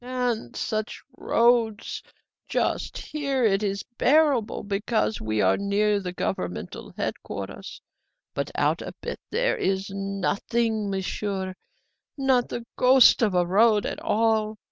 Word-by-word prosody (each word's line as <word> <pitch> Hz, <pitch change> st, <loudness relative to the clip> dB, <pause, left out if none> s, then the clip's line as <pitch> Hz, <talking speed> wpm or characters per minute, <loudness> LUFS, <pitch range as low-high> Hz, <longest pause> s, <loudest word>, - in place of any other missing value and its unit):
"And 245 Hz, -, -2 dB
such 215 Hz, +1 st, -3 dB
roads! 230 Hz, -3 st, +1 dB, 0.5 s
Just -, -, -1 dB
here 280 Hz, -4 st, -2 dB
it 195 Hz, -1 st, +3 dB
is 200 Hz, -1 st, -2 dB, 0.2 s
bearable, 285 Hz, -6 st, +3 dB
because 215 Hz, +2 st, -1 dB
we 110 Hz, -1 st, 0 dB
are 95 Hz, 0 st, +3 dB
near 205 Hz, +1 st, +1 dB
the 185 Hz, -2 st, -5 dB
governmental 185 Hz, -, -4 dB
headquarters; -, -, -5 dB, 0.5 s
but -, -, -2 dB
out -, -, +1 dB
a -, -, -7 dB
bit -, -, -5 dB
there's 195 Hz, -, 0 dB
nothing, 200 Hz, +3 st, -1 dB
Monsieur 190 Hz, 0 st, -3 dB, 0.6 s
not 265 Hz, -3 st, +2 dB
the 235 Hz, -, -5 dB
ghost 255 Hz, 0 st, +7 dB
of 210 Hz, -5 st, +2 dB
a 175 Hz, -1 st, +3 dB
road 210 Hz, +3 st, +4 dB
at -, -, -3 dB
all. 220 Hz, -1 st, +1 dB
215 Hz, 120 wpm, -25 LUFS, 195-240 Hz, 0.6 s, ghost